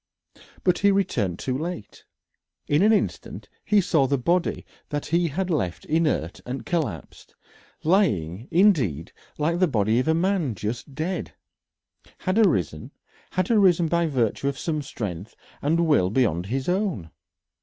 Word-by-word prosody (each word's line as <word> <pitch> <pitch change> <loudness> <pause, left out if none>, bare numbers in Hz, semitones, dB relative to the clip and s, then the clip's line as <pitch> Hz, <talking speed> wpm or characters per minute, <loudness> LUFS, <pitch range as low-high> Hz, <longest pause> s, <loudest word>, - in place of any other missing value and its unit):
But 180 -1 +2
he 200 - +4
returned 115 - 0
too 130 +5 -3
late. 155 - -6 0.6
In 145 +3 +2
an 215 +2 +5
instant 215 - -2
he 210 - +3
saw 160 -7 +2
the 140 +1 +1
body 170 +7 0 0.2
that 145 -1 -3
he 170 +2 +1
had 180 +5 -2
left 95 - -2
inert 155 - 0
and 130 +2 -6
collapsed 160 - -4 0.5
lying, 115 - +1
indeed, 135 - +2 0.2
like 165 +3 0
the 185 - +4
body 110 -3 +1
of 130 - -1
a 160 - +3
man 170 - 0
just 115 +8 -5
dead 170 +5 -3 0.9
had 185 +3 +1
arisen, 90 - +1 0.4
had 185 +4 0
arisen 185 -6 +4
by 170 +1 +1
virtue 130 -2 0
of 140 -1 -2
some 155 -1 -2
strength 105 - -6 0.3
and 165 +4 +2
will 115 - +3
beyond 95 -7 +1
his 130 +4 -2
own. 180 - -1
150 Hz, 145 wpm, -24 LUFS, 110-180 Hz, 0.9 s, an